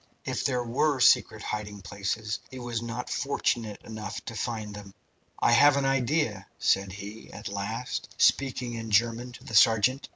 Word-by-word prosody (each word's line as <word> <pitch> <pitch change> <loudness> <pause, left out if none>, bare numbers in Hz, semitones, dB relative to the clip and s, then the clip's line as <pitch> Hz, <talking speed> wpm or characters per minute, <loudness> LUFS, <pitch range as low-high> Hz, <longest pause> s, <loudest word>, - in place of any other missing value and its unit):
If - - -2
there 125 -2 +1
were 130 +4 +1
secret - - +4
hiding 105 -2 -5
places, 100 +3 -3
he 130 - -9
was 120 -2 -3
not 120 +1 -5
fortunate 115 -6 -1
enough 110 -2 -6
to - - -5
find 110 -2 -3
them. 100 -1 -10 0.4
"I - - +3
have 140 +4 +6
an 140 - +1
idea," 130 -6 0
said 95 0 +2
he, 105 +2 -9
at 105 -1 -7
last, 100 +5 -4
speaking 125 -3 +2
in 115 -1 -5
German 115 +3 +2
to - - -13
the - - -10
sergeant. 115 +4 +4
115 Hz, 165 wpm, -28 LUFS, 105-125 Hz, 0.4 s, have